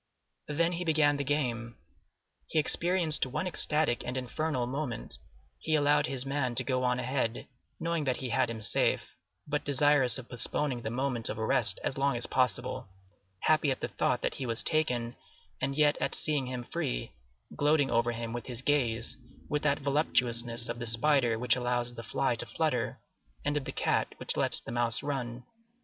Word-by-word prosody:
Then 165 +3 +1
he 175 0 -3
began 155 -3 +3
the 140 - -1
game. 120 -5 -2 0.7
He - - -3
experienced 170 +1 +3
one 160 +9 -3
ecstatic 150 -7 +2
and 125 +1 -4
infernal 130 +1 -2
moment; 130 -2 -4 0.4
he 155 - 0
allowed 145 0 +3
his 135 -1 -2
man 135 -3 -1
to - - +4
go 130 -1 0
on 125 0 +2
ahead, 125 -2 -2 0.3
knowing 165 -2 -1
that 130 -2 0
he 130 - -4
had 120 +1 +1
him 110 -1 -5
safe, - - +1 0.4
but 150 0 -1
desirous 145 -2 +3
of 125 -2 -9
postponing 125 +1 0
the 110 - -3
moment 125 -1 0
of 105 - -4
arrest 110 -2 +5
as 135 - -2
long 140 -2 +2
as 120 - +3
possible, 125 -1 0 0.5
happy 155 -2 +3
at 130 - -1
the - - -3
thought 125 - 0
that - - 0
he 130 - -4
was 115 0 0
taken 125 -7 +1 0.5
and 135 +1 -1
yet 150 0 +3
at - - 0
seeing 145 -4 0
him 125 -1 -4
free, - - -3 0.4
gloating 145 -1 +2
over 120 +1 +2
him 115 0 -5
with 120 - -5
his 125 0 -5
gaze, 120 -6 +1 0.3
with 150 0 0
that 145 0 +1
voluptuousness 120 -5 +1
of 120 - -4
the 115 - -3
spider 120 0 +2
which 125 +2 +2
allows 120 -1 -1
the 115 - -7
fly 115 - 0
to - - -4
flutter, - - -1 0.5
and 145 0 0
of 145 -2 -1
the - - -4
cat - - 0
which - - -3
lets - - +1
the - - -8
mouse 120 -1 0
run. 125 -4 -3
130 Hz, 185 wpm, -30 LUFS, 120-145 Hz, 0.7 s, arrest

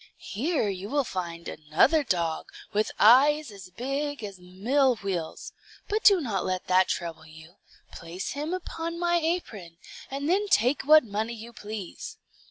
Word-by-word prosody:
Here 275 - -1
you 195 0 -4
will 285 +1 +1
find 170 -6 -5
another 155 - +2
dog, 170 - -1 0.3
with 210 +1 +1
eyes 280 +5 +6
as 195 -2 -11
big 275 +6 -3
as 200 -3 -7
mill 235 +9 +1
wheels; 190 -6 -5 0.3
but 425 +1 -1
do 400 -3 +7
not 220 - -2
let 185 -1 -2
that 185 0 +4
trouble 165 -2 -4
you. 160 +4 -15 0.3
Place 170 +3 -6
him 295 +3 -4
upon 335 -2 -4
my 345 0 +2
apron, 240 - -3 0.3
and 275 +2 -4
then 395 +5 +2
take 250 - +3
what 310 +1 +7
money 220 +2 -3
you 230 +1 -10
please. 210 -4 -7
220 Hz, 155 wpm, -27 LUFS, 185-295 Hz, 0.3 s, do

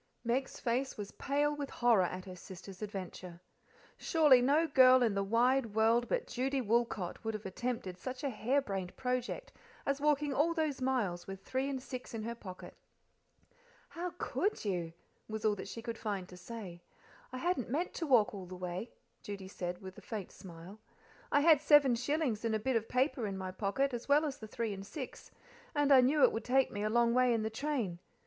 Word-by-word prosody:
Meg's 250 +3 -1
face 255 +2 -1
was 205 -1 -6
pale 290 +1 0
with 285 -1 -4
horror 240 -5 +3
at 185 +1 -5
her 185 -1 -8
sister's 185 +1 -11
adventure. 185 -4 -6 0.6
Surely 300 -6 +5
no 290 +6 +4
girl 260 -4 +6
in 225 -3 +2
the 200 - 0
wide 230 +2 +2
world 230 +2 +3
but - - 0
Judy 265 +2 -1
Woolcot 230 -6 0
would 225 -1 -2
have 215 - -7
attempted 190 -2 -4
such 255 +6 -6
a 280 - +1
harebrained 215 -6 -1
project 255 - -2 0.3
as 280 0 0
walking 295 -1 +2
all 325 +5 +2
those 310 -5 -1
miles 220 -10 0
with 195 0 -7
three 265 +2 -1
and 270 -2 -2
six 250 -3 -7
in 220 - -4
her 230 +1 -3
pocket. 185 -6 -10 1.1
"How 350 +2 -4
COULD 410 - -1
you?" 175 -5 -2 0.4
was 220 0 -4
all 210 -1 +3
she 225 +4 -7
could 230 -2 -5
find 200 -4 -3
to 180 - -11
say. 180 -2 -8 0.5
"I 255 - -5
hadn't 305 -4 -1
meant 320 +8 -1
to 330 - -3
walk 235 -7 +4
all 190 -3 -7
the 185 - -8
way," 180 +5 -4 0.3
Judy 200 -2 -7
said, 180 -1 -5
with 190 0 -8
a - - -16
faint 210 -5 -6
mile. 180 +3 -10 0.5
"I 285 - +4
had 310 -2 +6
seven 295 -4 +6
shillings 255 -2 0
in 225 -1 +1
a - - 0
bit 260 +4 0
of 225 -1 0
paper 255 -3 +1
in 195 -1 -4
my 185 -1 -4
pocket, 225 +8 0
as 240 +3 -5
well 295 +2 +5
as 280 -3 -4
the 220 - -8
three 220 0 -3
and 195 0 -7
six, 260 +5 -8 0.5
and 290 -1 +3
I 265 -2 +9
knew 280 +4 +3
it - - +7
would 225 - -3
take 265 +1 +2
me 205 - -4
a 215 - 0
long 235 +1 +3
way 250 -1 +4
in 220 - -1
the 220 - -2
train. 225 - -2
235 Hz, 200 wpm, -33 LUFS, 200-270 Hz, 1.1 s, I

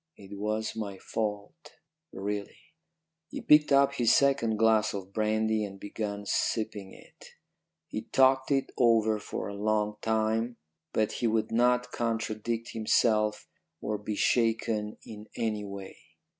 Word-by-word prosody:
It 100 0 -10
was 110 +2 -2
my 100 -3 -5
fault, 105 - -5 0.4
really." 100 +1 -4 0.7
He - - -6
picked 150 -1 +5
up 140 0 +5
his 120 -2 +2
second 135 -6 +3
glass 110 -1 +3
of 95 0 -7
brandy 110 0 +1
and 95 -1 -7
began 100 0 -5
sipping 105 -2 -1
it. - - -16 0.6
He 110 - -5
talked 130 +1 +3
it 135 -2 +1
over 110 -3 +4
for - - -5
a 100 - -6
long 105 +1 0
time, 110 +2 0 0.3
but 110 -1 +1
he 120 - -1
would 110 -1 0
not 125 +1 +2
contradict 115 0 -2
himself 110 -1 +1 0.3
or 105 -1 -3
be 105 +1 -4
shaken 110 -2 +1
in 105 0 -10
any 105 -2 -2
way. 100 -1 -8
110 Hz, 135 wpm, -29 LUFS, 105-115 Hz, 0.7 s, picked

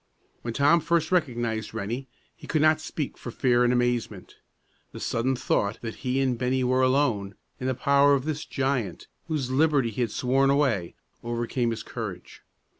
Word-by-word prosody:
When 115 -1 -5
Tom 145 +5 +5
first 170 0 0
recognized 120 - -1
Rennie, 120 +7 -4 0.3
he - - -13
could 155 -2 +1
not 155 0 +4
speak 150 -2 -5
for - - -7
fear 120 0 +2
and 120 - +3
amazement. 120 -1 -1 0.6
The - - -7
sudden 130 +3 0
thought 105 -3 0
that 115 -1 -5
he 130 0 -1
and 130 -3 0
Bennie 130 +1 +1
were 130 +1 +2
alone, 125 -7 +1 0.2
in 130 - -3
the 130 - 0
power 140 +2 +4
of 135 0 -2
this 155 -1 -2
giant 130 - -2 0.2
whose 140 -5 -2
liberty 140 -4 +2
he 120 - -3
had 120 - +1
sworn 135 +5 +2
away, 130 -11 +1 0.3
overcame 120 +1 -1
his 115 - -4
courage. - - -7
130 Hz, 175 wpm, -26 LUFS, 120-140 Hz, 0.6 s, Tom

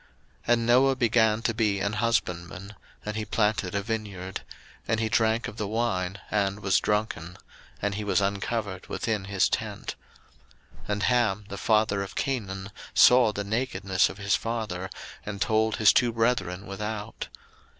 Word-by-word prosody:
01:009:020 - - -29 0.4
And 115 -1 +1
Noah 130 +3 +5
began 115 -3 +3
to 115 - +1
be 105 -3 +1
an 100 +2 -1
husbandman, 100 -4 -1 0.3
and 105 0 -3
he 110 - -2
planted 105 -4 0
a 100 - 0
vineyard: 100 -4 -4
01:009:021 - - -14 0.3
And 115 -1 +1
he 110 -1 0
drank 110 +1 +2
of 110 - -9
the 105 - -2
wine, 100 -4 -1
and 100 0 0
was 95 -2 +3
drunken; 100 -5 -2 0.5
and 105 0 +1
he 105 +1 -3
was 105 - +2
uncovered 100 0 -2
within 110 -4 -2
his 100 -1 +2
tent. - - -3 0.9
01:009:022 - - -15
And 105 0 0
Ham, 110 -5 +2
the 100 - -6
father 110 -2 +2
of 100 - -6
Canaan, 100 -7 -3 0.2
saw 125 -3 +7
the 100 -1 -3
nakedness 100 -4 +1
of - - -9
his 100 0 +1
father, 110 -5 -3 0.3
and 100 -1 -5
told 110 +1 +2
his 110 -2 +6
two 120 -1 +3
brethren 110 -5 0
without. 105 +2 -5
105 Hz, 165 wpm, -27 LUFS, 100-115 Hz, 0.9 s, saw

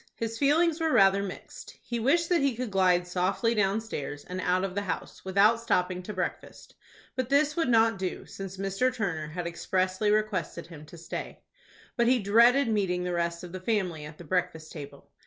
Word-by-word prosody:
His 225 0 -4
feelings 315 +3 +3
were 320 -1 +1
rather 195 -5 +5
mixed. 195 -2 -8
He 235 -1 -3
wished 325 +9 +2
that 345 -4 +3
he 275 -3 +1
could 245 -2 -4
glide 180 -2 +3
softly 185 +6 0
downstairs, 195 -8 -2
and 185 +1 -5
out 185 +1 +1
of 195 -2 -2
the 200 - -1
house, 185 -4 -5
without 200 +4 +3
stopping 180 -5 0
to 185 - -7
breakfast. 185 -3 -5 0.4
But 255 -2 -2
this 295 +2 +3
would 330 -6 0
not 225 -2 +4
do, 185 -1 -4
since 195 -1 -8
Mr. 195 +6 0
Turner 180 -10 -3
had 170 +3 -5
expressly 185 +4 -1
requested 205 -6 -1
him 155 -3 -12
to 170 - -12
stay. 165 +1 -7 0.5
But 235 -1 +3
he 255 +1 +5
dreaded 235 +6 +4
meeting 190 -5 0
the 180 0 -2
rest 170 0 -2
of 175 - -8
the 185 - -6
family 185 -6 -1
at 150 +1 -10
the - - -10
breakfast 165 -1 -2
table. 145 -3 -10
195 Hz, 195 wpm, -28 LUFS, 180-230 Hz, 0.5 s, rather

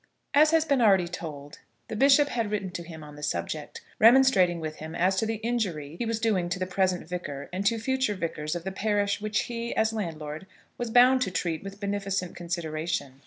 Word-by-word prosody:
As 300 +2 +6
has 320 0 +3
been 280 -4 +2
already 195 -5 +5
told, 150 -4 -8 0.3
the - - -5
bishop 280 +4 +5
had 230 -5 -1
written 200 -3 -2
to 175 - -5
him 160 -2 -10
on 150 -1 -11
the 150 - -11
subject, 150 - -4 0.2
remonstrating 220 -8 +5
with 155 -1 -5
him 160 +1 -7
as 185 +3 +2
to 220 - +1
the 225 - -1
injury 200 -10 -2
he 235 - -1
was 225 -1 -1
doing 200 -6 +1
to 180 - -1
the 185 - -2
present 185 -2 0
vicar, 145 -6 -5
and 195 +2 0
to 230 +1 +2
future 260 -1 0
vicars, 160 -3 -3
of 175 - -4
the 190 - -3
parish 205 0 0
which 215 0 0
he, 235 -1 -4
as 220 0 +2
landlord, 160 -5 -5 0.3
was 240 -1 -4
bound 250 +3 +6
to 225 - +1
treat 170 -3 -2
with 195 0 -8
beneficent 200 -3 -2
consideration. 160 -5 -3
195 Hz, 210 wpm, -27 LUFS, 170-225 Hz, 0.3 s, As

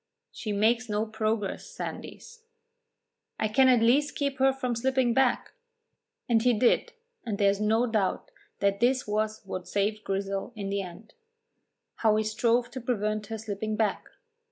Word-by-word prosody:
"She 215 - -5
makes 225 +3 +2
no 210 +1 0
progress, 215 -2 -2
Sandys." 470 -1 -8 1.0
"I 215 - 0
can 260 +5 +4
at 245 -3 +5
least 285 +5 +3
keep 280 -2 -2
her 270 0 +5
from 255 -2 -2
slipping 260 0 +1
back." 265 0 +2 0.8
And 230 -2 +3
he 245 +1 +4
did, 240 +3 +2 0.3
and 210 -3 -3
there 200 -1 +4
is 200 +1 -4
no 220 +3 +3
doubt 215 -5 -1 0.3
that 200 0 +2
this 255 +2 +2
was 215 +1 -1
what 185 -2 -6
saved 205 +2 -1
Grizel 195 +3 -3
in 200 -2 -4
the 200 0 -1
end. 185 +4 -10 0.8
How 220 -2 +3
he 215 - +2
strove 230 +2 +1
to 260 - -6
prevent 215 -3 -1
her 225 - -4
slipping 215 0 -4
back! 215 -2 0
220 Hz, 160 wpm, -28 LUFS, 210-245 Hz, 1.0 s, at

